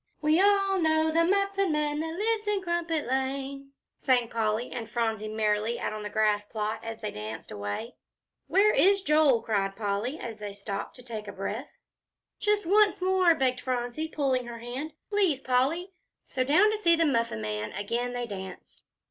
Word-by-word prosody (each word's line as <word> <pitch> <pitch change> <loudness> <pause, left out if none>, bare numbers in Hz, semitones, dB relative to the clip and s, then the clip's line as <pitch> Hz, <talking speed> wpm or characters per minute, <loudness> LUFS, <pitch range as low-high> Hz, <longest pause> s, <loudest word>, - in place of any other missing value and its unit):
"We 310 +3 +3
all 395 -1 +3
know 315 -1 +2
the 330 +1 +3
Muffin 395 0 +1
Man 300 -1 0
that 320 +1 -3
lives 430 +1 0
in 410 -2 0
Crumpet 340 -3 -1
Lane," 275 +1 -3 0.2
sang 245 -3 +2
Polly 225 +1 -1
and 225 -2 -5
Phronsie 225 -2 -1
merrily, 215 +1 0
out - - -2
on 215 - -5
the 210 - -5
grass 210 -1 +1
plot, 215 0 -3
as 225 -1 -6
they 210 - -3
danced 105 +1 -7
away. 105 - -5 0.5
"Where 415 +2 +4
is 395 +1 +4
Joel?" 300 -8 +4
cried 195 -3 0
Polly, 210 +6 -2
as 225 -2 -7
they 205 -1 -6
stopped 200 0 -5
to 250 - -12
take 220 -3 -6
breath. 205 +7 -4 0.7
"Just 415 -1 +1
once 410 +3 +4
more," 370 -2 +4
begged 255 -3 0
Phronsie, 250 +4 -2
pulling 265 -5 0
her 235 -1 -7
hand; 255 +6 -6 0.2
"please, 385 -9 +2
Polly." 275 +9 0 0.3
So 255 - -2
down 360 +11 +4
to 430 - -2
see 340 -5 +5
the 330 0 +2
Muffin 230 - 0
Man 105 0 -3
again 235 +5 -2
they 245 0 -2
danced. 190 -4 -9
255 Hz, 175 wpm, -28 LUFS, 220-335 Hz, 0.7 s, see